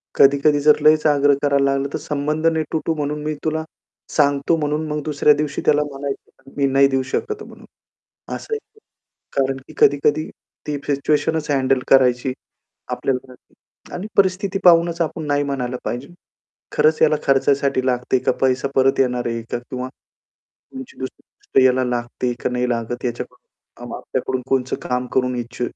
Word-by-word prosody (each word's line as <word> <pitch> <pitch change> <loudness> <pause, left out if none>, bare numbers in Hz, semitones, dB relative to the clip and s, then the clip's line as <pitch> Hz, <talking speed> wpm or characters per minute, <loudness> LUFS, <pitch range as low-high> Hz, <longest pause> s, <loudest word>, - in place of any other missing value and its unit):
कधी-कधी 140 +1 +4
जर 150 +1 +5
लईच 155 0 +5
आग्रह 145 -1 +4
करायला 140 -1 +2
लागला, 135 0 0
तर - - 0
संबंध 150 +1 -1
नाही 160 -1 +1
तुटू 160 +1 0
म्हणून 150 0 -3
मी 155 0 -2
तुला 160 0 -1 0.5
सांगतो 145 +1 +3
म्हणून 150 0 -1
मग 150 0 -2
दुसऱ्या 150 0 +3
दिवशी 145 0 -2
त्याला 150 0 +4
म्हणायचं 135 -1 -8
मी 140 - +2
नाही 135 +1 +4
देऊ 135 -1 0
शकत 430 - -1
आहे - - -8
म्हणून, - - -14 0.7
असं 450 - -6
आहे 435 - -1
ते. 435 - -28 0.6
कारण 135 -1 +1
की - - -14
कधी-कधी 145 +2 +3 0.4
ती 150 - -2
सिच्युएशनच 150 +2 0
हँडल 135 -1 +2
करायची 130 -1 +4 0.6
आपल्याला 130 -1 -2
ती, - - -27 0.4
आणि 180 +4 -5
परिस्थिती 195 0 +2
पाहूनच 170 -1 +5
आपण 160 -1 -4
नाही 145 0 +1
म्हणायला 130 -3 -3
पाहिजे. 125 +3 -4 0.7
खरंच 155 +1 +3
याला 155 -1 +5
खर्चायसाठी 135 -1 +2
लागते, 125 0 +1
का 130 - +1
पैसा 130 +1 +1
परत 135 +1 +3
येणार 125 -2 +1
आहे 115 0 -3
का? - - -1
किंवा 125 +1 -6 0.6
तुमची 265 -1 -12
दुसरी 130 - -6
गोष्ट 135 - 0
याला 130 0 +3
लागते, 120 0 -2
का - - +1
नाही 125 0 -1
लागत. 120 +1 -3
याच्याकडून 120 -1 -5 0.5
आपल्याकडून 130 - -3
कोणतं 130 -1 0
काम 125 0 0
करून 125 -1 +1
इच्छ 120 +1 -7
140 Hz, 165 wpm, -20 LUFS, 130-150 Hz, 0.7 s, जर